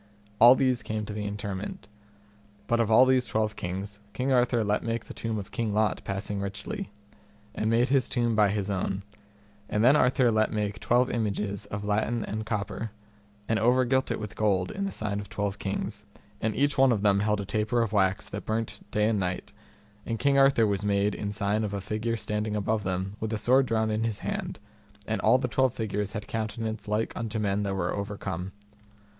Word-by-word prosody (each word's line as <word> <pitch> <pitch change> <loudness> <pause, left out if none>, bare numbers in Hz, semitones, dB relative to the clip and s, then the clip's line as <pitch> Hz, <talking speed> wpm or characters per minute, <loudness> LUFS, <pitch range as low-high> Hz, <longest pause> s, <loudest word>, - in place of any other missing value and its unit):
All 120 +3 +9
these 130 -2 +2
came 110 0 -3
to 105 - -6
the 105 -1 -3
interment. 100 -1 -5 0.8
But 120 +2 +1
of 115 -2 +2
all 115 +4 +7
these 130 -1 +3
twelve 110 -1 0
kings 100 +2 -5
King 130 +3 -1
Arthur 120 -2 +3
let 105 0 +1
make 115 0 -3
the - - -9
tomb 115 -1 -3
of 100 -2 -6
King 110 -3 -2
Lot 105 -2 +1
passing 100 0 -3
richly, 180 - -5 0.6
and 110 - -1
made 120 +3 +3
his 135 -2 +2
tomb 120 -2 +1
by 105 -1 +5
his 100 -1 -1
own; 95 0 -2 0.7
and 105 - +1
then 130 +5 +7
Arthur 125 -3 +4
let 110 0 +2
make 105 0 -2
twelve 125 +2 +2
images 105 -3 -2
of 100 0 -5
latten 110 +2 0
and 110 +1 -4
copper, 110 +1 -3 0.6
and 110 -1 +1
over 125 +4 +4
gilt 130 +2 +1
it - - -2
with 105 -2 -6
gold, 95 -4 +1
in 200 - -3
the 195 - -2
sign 105 -1 -3
of 105 - -8
twelve 100 -1 -3
kings, 100 +1 -3 0.4
and 110 -1 0
each 145 0 +1
one 135 -1 +6
of 105 -3 0
them 100 -1 +4
held 105 0 +1
a 100 - -3
taper 110 +4 +1
of 110 -2 -4
wax 95 -1 +2
that 100 - -6
burnt 110 -1 -2
day 105 0 +2
and 110 -2 +1
night; 90 +2 -3 0.5
and 115 0 -3
King 140 +3 +2
Arthur 135 -4 +5
was 100 -1 0
made 100 0 +2
in 100 -1 -3
sign 105 +1 0
of 105 -1 -2
a - - -2
figure 110 +4 -2
standing 105 0 -2
above 105 +1 0
them 95 +2 -3
with 110 0 -3
a 110 - 0
sword 130 +5 +4
drawn 110 -1 +1
in 110 +1 0
his 115 -3 -1
hand, - - -3 0.5
and 110 - -2
all - - +5
the 125 - -1
twelve 130 +2 +1
figures 105 -2 -2
had 105 -1 -4
countenance 110 0 -3
like 105 +2 0
unto 115 -1 -3
men 100 -1 0
that 100 -1 -1
were 90 -2 -1
overcome. 100 -3 -4
110 Hz, 210 wpm, -28 LUFS, 100-115 Hz, 0.8 s, All